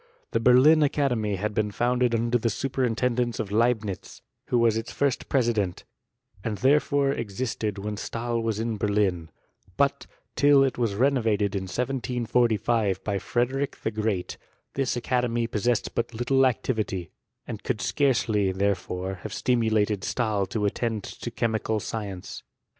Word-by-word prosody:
Tbe 115 - +1
Berlin 135 +6 +6
Academy 125 -8 +1
had 105 +3 -2
been 105 0 0
founded 120 +2 +1
under 120 +1 +1
the 115 - 0
su 135 +5 -2
perintendence 125 -2 0
of 100 - -3
Leibnitz, 110 -3 -1 0.2
who 125 - +1
was 115 -2 +3
its 115 +1 -3
first 140 -3 -1
president; 115 -8 0 0.6
end 110 -2 -2
therefore 140 +3 +3
existed 110 -3 -3
when 105 +1 -4
Stahl 115 +2 -2
was 110 -2 -1
in 115 -1 -2
Berlin: 100 -6 0 0.5
but, 140 0 +1 0.3
till 140 +1 +6
it 135 - 0
was 115 -4 0
renovated 110 -5 +2
in 95 -1 -2
1745 120 -3 0
by 100 -2 -1
Frederick 130 +7 -1
the 110 - 0
Great, 105 -4 -2 0.4
this 135 -2 -1
academy 120 -1 0
possessed 115 +1 0
but 115 0 -2
little 130 +3 +3
activity, 110 -8 -2 0.3
and - - -6
could - - -2
scarcely, 110 -8 +1
therefore, 95 -1 -2
have 110 - -6
stimulated 110 -4 +1
Stahl 105 -5 0
to 110 -3 -2
attend 110 0 -1
to - - -6
chemical 110 -1 -1
science. 100 -4 -6
115 Hz, 140 wpm, -26 LUFS, 105-125 Hz, 0.6 s, Berlin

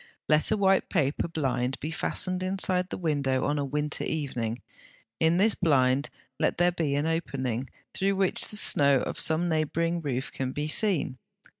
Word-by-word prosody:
Let 155 0 +3
a 215 - +1
white 195 -1 +2
paper 150 -5 0
blind 135 -5 -2
be 155 - -4
fastened 185 +3 -1
inside 185 -1 -1
the - - -5
window 140 -6 0
on 145 +1 0
a - - -1
winter 150 +2 -2
evening; 125 -6 -3 0.6
in 165 +1 +3
this 210 +3 +5
blind 135 -5 +2 0.3
let - - +1
there 175 +1 +3
be 160 -5 -1
an 145 +2 0
opening, 135 -6 -2 0.2
through 195 +1 0
which 190 -1 +2
the 210 - -3
snow 140 -9 +4
of - - -4
some 160 +2 +2
neighbouring 165 +1 -1
roof 135 -4 -3
can 130 -1 -4
be 150 +1 -3
seen. 155 -7 +1
155 Hz, 170 wpm, -27 LUFS, 135-175 Hz, 0.6 s, this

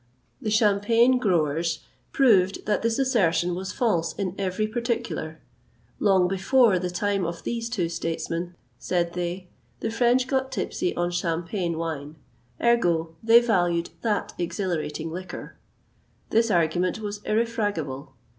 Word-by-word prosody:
The 220 - -2
Champagne 225 +4 +4
growers 165 - 0 0.3
proved 200 -8 +3
that 210 - +1
this 230 0 0
assertion 190 -10 +2
was 185 +1 -4
false 170 -9 0
in 190 -3 -3
every 195 +2 -1
particular. 230 -8 -3 0.6
Long 190 -3 +4
before 195 +2 +3
the 180 0 -2
time 195 +2 -1
of 170 0 -4
these 230 -1 -3
two 195 -8 -1
statesmen, 165 +1 -3 0.2
said 170 -1 -1
they, 180 +1 -4 0.3
the 225 - -2
French 245 +2 +3
got 265 0 -1
tipsy 360 - -2
on 175 0 0
Champagne 170 0 -2
wine; 155 -2 -4 0.4
ergo, 170 -9 +2
they 230 +1 +7
valued 175 -7 +1
that 215 -3 -1
exhilarating 165 -3 -2
liquor. 185 +2 -7 0.7
This 230 +1 +3
argument 175 0 +1
was 205 -1 -5
irrefragable. 205 - -2
185 Hz, 125 wpm, -25 LUFS, 170-225 Hz, 0.7 s, they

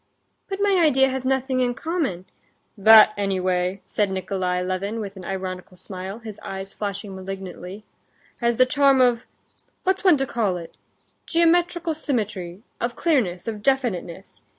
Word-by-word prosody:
"But 390 0 -4
my 400 -2 +3
idea 270 -3 +4
has 260 -1 -4
nothing 265 0 0
in 245 -1 +1
common...." 285 - -2 0.5
"That, 215 +1 +8
anyway," 185 -1 -1
said 205 -2 0
Nikolay 185 -1 -2
Levin, 195 +4 -3
with 200 -2 -6
an 185 -2 -10
ironical 185 -1 -5
smile, 190 +2 -7
his 220 -3 -9
eyes 195 0 -6
flashing 200 -1 -5
malignantly, 190 +1 -7 0.5
"has 235 -1 0
the 255 - +6
charm 275 0 +4
of—what's 255 +9 -2
one 360 -6 +6
to 270 - 0
call 215 -8 -1
it?—geometrical 335 - -1
symmetry, 215 - -3 0.2
of 235 0 -2
clearness, 230 - 0
of 215 -2 -4
definiteness. 205 -9 -2
215 Hz, 135 wpm, -23 LUFS, 190-265 Hz, 0.5 s, That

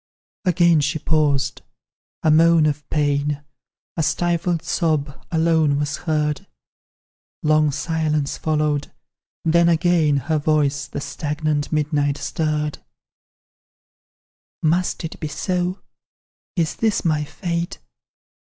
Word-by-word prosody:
Again 170 -3 +4
she 145 +2 0
paused; 145 -4 +1 0.6
a 155 - +4
moan 165 0 +5
of 150 -1 -2
pain, 145 -1 0 0.5
A 165 - 0
stifled 170 +1 0
sob, 155 -4 -1
alone 160 -3 +3
was 145 0 -1
heard; 150 -3 -1 1.0
Long 155 0 +4
silence 150 0 -1
followed 150 -2 -1 0.5
then 170 +1 +4
again 165 -3 +3
Her 155 +3 0
voice 145 -2 +1
the 140 - -5
stagnant 150 0 -2
midnight 145 -2 +1
stirred. 150 -2 -2 1.8
"Must 175 +4 +1
it 160 - -7
be 155 - -3
so? 180 +3 -2 0.7
Is 165 -4 0
this 220 -4 0
my 155 -2 +2
fate? 170 +2 -3
155 Hz, 105 wpm, -21 LUFS, 145-165 Hz, 1.8 s, moan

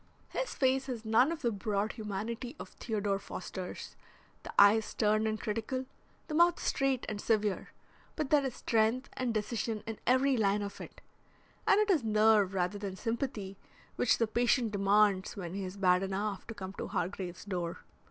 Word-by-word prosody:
His - - -3
face 265 0 +2
has 235 -4 -5
none 230 +7 +4
of 325 -3 -5
the 235 - +2
broad 205 +1 -1
humanity 225 +4 -5
of - - -7
Theodore 205 -3 -2
Foster's, 185 -1 -7 0.5
the - - -8
eye 200 +2 +8
is 220 - -2
stern 215 0 +1
and 215 0 -1
critical, 230 +4 -3 0.4
the - - -5
mouth 345 +2 +4
straight 270 -2 0
and 210 -1 -4
severe, 210 -3 0 0.5
but 305 -3 -3
there 295 -2 +5
is 265 -3 -3
strength 230 +4 +1
and 255 -2 -1
decision 220 0 -2
in 225 -1 -5
every 260 +2 +4
line 205 -1 +2
of 200 - -7
it, - - -11 0.7
and - - +6
it 425 -1 +3
is 315 -9 +2
nerve 215 -2 +4
rather 185 +2 0
than 200 -2 -4
sympathy 220 -3 -3 0.4
which - - +3
the 230 - +2
patient 240 0 +2
demands 200 -1 +2
when 175 -3 -5
he 195 0 -3
is 185 +1 -6
bad 180 -2 +4
enough 195 +1 -3
to 225 - -7
come 190 -2 -6
to - - -3
Hargrave's 180 0 -4
door. 175 -4 -3
215 Hz, 180 wpm, -32 LUFS, 200-245 Hz, 0.7 s, eye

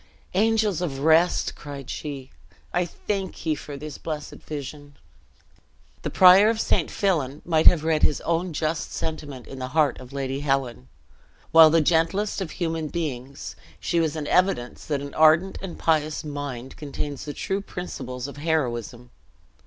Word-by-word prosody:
"Angels 215 -2 +2
of 150 -7 -2
rest," 160 +3 +3
cried 140 -3 -8
she, 140 -3 -6 0.4
"I 175 0 +2
thank 190 0 -4
ye 160 - +2
for 145 -1 -7
this 150 0 -8
blessed 150 -2 -5
vision!" 145 -1 -8 1.1
The - - -3
prior 190 +3 +7
of 225 -1 0
St. - - +1
Fillan 150 -9 -1
might 160 -2 +3
have 160 -3 +7
read 160 -1 +1
his 150 - +3
own 170 +2 -1
just 155 0 -2
sentiment 145 -5 -5
in 135 - -9
the 130 - -3
heart 150 -2 +3
of 130 0 -12
Lady 135 -1 -3
Helen. 135 - -1 0.6
While 160 -1 +9
the 165 +1 +4
gentlest 175 +7 +1
of 185 - -3
human 165 -3 -1
beings, 140 -5 -5 0.2
she 170 - 0
was 160 -2 0
an 155 -2 -3
evidence 180 -9 +1
that 145 -3 -1
an 140 0 -7
ardent 160 +4 +4
and 190 -3 -6
pious 155 -1 +1
mind 145 -4 -6
contains 145 -1 -5
the 145 - -5
true 195 +1 -2
principles 130 -10 -6
of 140 - -10
heroism. 125 -6 -2
155 Hz, 160 wpm, -25 LUFS, 140-170 Hz, 1.1 s, While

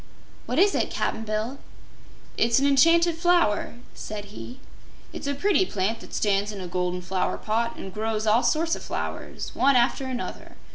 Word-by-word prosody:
"What 250 - -2
is 395 +4 +5
it, - - 0
Cap'n 225 - -2
Bill?" 215 +5 -3 0.8
"It's 230 0 +3
an 275 - +3
Enchanted 330 +5 +4
Flower," 345 - +2 0.2
said 205 -1 -7
he. 250 +4 -9 0.5
"It's - - -6
a 280 - 0
pretty 385 +6 +3
plant 215 - -1
that - - -9
stands 205 0 +1
in 205 - -7
a 185 - -5
golden 180 0 -2
flower 185 +1 -1
pot 230 +2 -1
an' 190 - -7
grows 215 +2 -2
all 220 +3 +4
sorts 325 +4 +1
o' - - -7
flowers, - - -5
one 275 +1 +3
after 250 +2 +2
another. 255 -1 -6
230 Hz, 175 wpm, -25 LUFS, 210-280 Hz, 0.8 s, is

